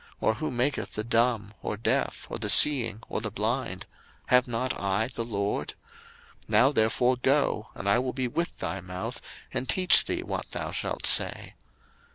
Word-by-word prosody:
or 110 Hz, -, +1 dB
who 155 Hz, +7 st, -4 dB
maketh 130 Hz, +3 st, -2 dB
the 105 Hz, -, -3 dB
dumb, 115 Hz, -2 st, 0 dB
or 105 Hz, -, -4 dB
deaf, 110 Hz, -, -1 dB
or -, -, -6 dB
the -, -, -3 dB
seeing, 120 Hz, -7 st, +5 dB
or -, -, -4 dB
the 110 Hz, -, -3 dB
blind? 110 Hz, -2 st, -3 dB, 0.4 s
have 125 Hz, +1 st, +4 dB
not 120 Hz, +2 st, -2 dB
I 100 Hz, +4 st, -1 dB
the 120 Hz, -2 st, -4 dB
LORD? 100 Hz, -3 st, -3 dB, 0.7 s
02:004:012 -, -, -30 dB
Now 110 Hz, +6 st, +4 dB
therefore 125 Hz, +1 st, +2 dB
go, 130 Hz, -4 st, 0 dB
and 100 Hz, -, -6 dB
I 100 Hz, +5 st, +4 dB
will 130 Hz, 0 st, -2 dB
be 130 Hz, -1 st, -2 dB
with 170 Hz, +8 st, -3 dB
thy 95 Hz, -, -4 dB
mouth, 90 Hz, +1 st, -6 dB, 0.3 s
and 130 Hz, -, -3 dB
teach 185 Hz, -1 st, +5 dB
thee -, -, -3 dB
what -, -, -5 dB
thou -, -, -4 dB
shalt -, -, -3 dB
say. -, -, +4 dB
115 Hz, 180 wpm, -27 LUFS, 105-130 Hz, 0.7 s, seeing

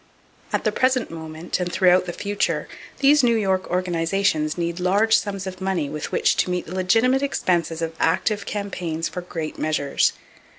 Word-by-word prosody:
At -, -, 0 dB
the -, -, +2 dB
present 255 Hz, -4 st, +1 dB
moment, 160 Hz, +1 st, -5 dB
and 180 Hz, -1 st, -2 dB
throughout 180 Hz, 0 st, +4 dB
the -, -, -2 dB
future, 205 Hz, +3 st, -2 dB, 0.3 s
these 285 Hz, +1 st, +6 dB
New 235 Hz, -1 st, +4 dB
York 190 Hz, -3 st, 0 dB
organizations 175 Hz, -2 st, 0 dB
need 170 Hz, 0 st, -2 dB
large 205 Hz, +5 st, +3 dB
sums 195 Hz, -2 st, -1 dB
of 185 Hz, 0 st, -7 dB
money 185 Hz, -7 st, -1 dB
with 150 Hz, -1 st, -5 dB
which -, -, +2 dB
to -, -, +1 dB
meet 180 Hz, 0 st, -2 dB
the 170 Hz, -, -8 dB
legitimate 225 Hz, +8 st, +2 dB
expenses 170 Hz, -, 0 dB
of 165 Hz, 0 st, -3 dB
active 205 Hz, +5 st, +1 dB
campaigns 175 Hz, -6 st, -3 dB
for 180 Hz, -, -5 dB
great 165 Hz, -3 st, -6 dB
measures. 155 Hz, -3 st, +1 dB
180 Hz, 170 wpm, -23 LUFS, 165-200 Hz, 0.3 s, these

